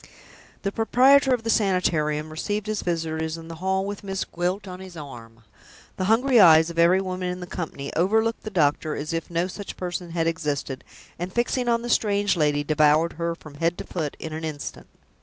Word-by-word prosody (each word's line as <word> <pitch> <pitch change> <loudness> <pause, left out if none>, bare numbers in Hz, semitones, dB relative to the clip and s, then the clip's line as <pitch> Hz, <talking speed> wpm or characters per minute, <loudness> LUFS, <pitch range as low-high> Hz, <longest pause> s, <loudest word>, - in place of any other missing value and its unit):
The 195 - -1
proprietor 265 +5 +4
of 245 -3 +1
the 225 - +1
Sanitarium 155 -7 +1
received 205 +6 -3
his 215 -1 -2
visitors 160 -2 -2
in 165 0 -10
the 165 - -7
hall 190 0 0
with 205 0 -5
Miss 195 -1 -3
Gwilt 180 +3 -2
on 180 0 -7
his 185 -2 -10
arm. 115 -6 -10 0.5
The 185 - -1
hungry 240 +4 +4
eyes 160 -3 +7
of 170 - -5
every 175 +3 +5
woman 185 -1 -3
in 180 0 -4
the 180 - -6
company 160 -6 -6
overlooked 220 +7 +1
the 215 - -6
doctor 155 -4 +1
as 150 +2 -4
if 165 0 -3
no 170 +1 0
such 195 +2 -7
person 175 -1 -4
had 165 -1 -1
existed; 145 -5 -2 0.4
and, 180 +2 -4
fixing 240 +2 0
on 235 0 +1
the - - -4
strange 205 -3 +2
lady, 150 -3 +1
devoured 155 +2 +3
her 170 0 -2
from 155 -3 -13
head 165 +4 -1
to - - -5
foot 155 -5 -4
in 160 - -6
an 160 +1 -5
instant. 155 -2 -6
175 Hz, 200 wpm, -24 LUFS, 160-200 Hz, 0.5 s, eyes